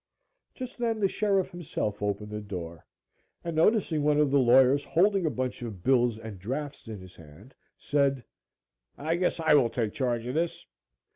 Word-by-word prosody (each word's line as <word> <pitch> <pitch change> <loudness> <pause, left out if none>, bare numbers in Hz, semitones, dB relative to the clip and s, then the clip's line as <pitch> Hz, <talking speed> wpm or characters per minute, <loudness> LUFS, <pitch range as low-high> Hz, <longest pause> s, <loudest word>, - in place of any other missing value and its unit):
Just 255 -1 -8
then 230 -2 0
the 200 - +3
sheriff 195 -2 0
himself 150 - -4
opened 105 +1 -2
the 105 0 -4
door 85 -5 -7 0.6
and, 170 -1 -4
noticing 165 -2 +2
one 150 0 +3
of 150 -2 +3
the 140 - +4
lawyers 130 +3 +5
holding 190 +2 +2
a - - +2
bunch 130 -3 -3
of 105 -7 -7
bills 120 -3 +3
and 110 -4 -9
drafts 135 +8 -5
in 110 -3 -7
his 95 -1 -13
hand, 85 - -15 0.2
said: 140 -3 +1 0.7
"I 160 +3 -1
guess 175 0 0
I 160 -2 +3
will 135 -5 +5
take 110 -3 -2
charge 120 -3 -1
of 125 - -3
this." 165 +2 -2
135 Hz, 175 wpm, -28 LUFS, 110-165 Hz, 0.7 s, lawyers